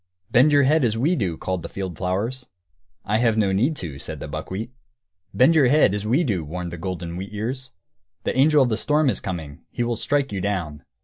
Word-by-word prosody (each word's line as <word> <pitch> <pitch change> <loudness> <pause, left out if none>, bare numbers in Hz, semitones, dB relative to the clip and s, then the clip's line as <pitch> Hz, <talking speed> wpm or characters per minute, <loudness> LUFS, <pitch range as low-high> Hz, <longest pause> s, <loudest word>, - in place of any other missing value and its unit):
"Bend 130 +5 +5
your 145 -1 +5
head, 150 +3 +3
as 115 -2 +1
we 155 +10 +2
do," 90 - -2
called 95 -1 -3
the - - -7
field 95 -3 -5
flowers. 105 +9 -2 0.6
"I 105 +2 +1
have 115 -2 +2
no 100 -3 +2
need 125 +12 +1
to," 80 - -6
said - - -5
the - - -6
buckwheat. 95 - -5 0.6
"Bend 130 +6 +5
your 150 -5 +5
head, 140 -6 +4
as 105 +1 -3
we 135 +10 +3
do!" 100 - -1
warned 85 +3 -5
the 85 - -6
golden 85 -1 -5
wheat 95 +3 -6
ears; 130 +5 -4 0.5
"the - - -1
angel 145 +2 +5
of 125 - 0
the 110 - 0
storm 150 +2 +2
is - - -2
coming; 80 -5 -6
he 120 - -2
will 120 0 -1
strike 140 +4 0
you 100 -2 -3
down." 90 -7 -3
110 Hz, 225 wpm, -23 LUFS, 90-130 Hz, 0.6 s, Bend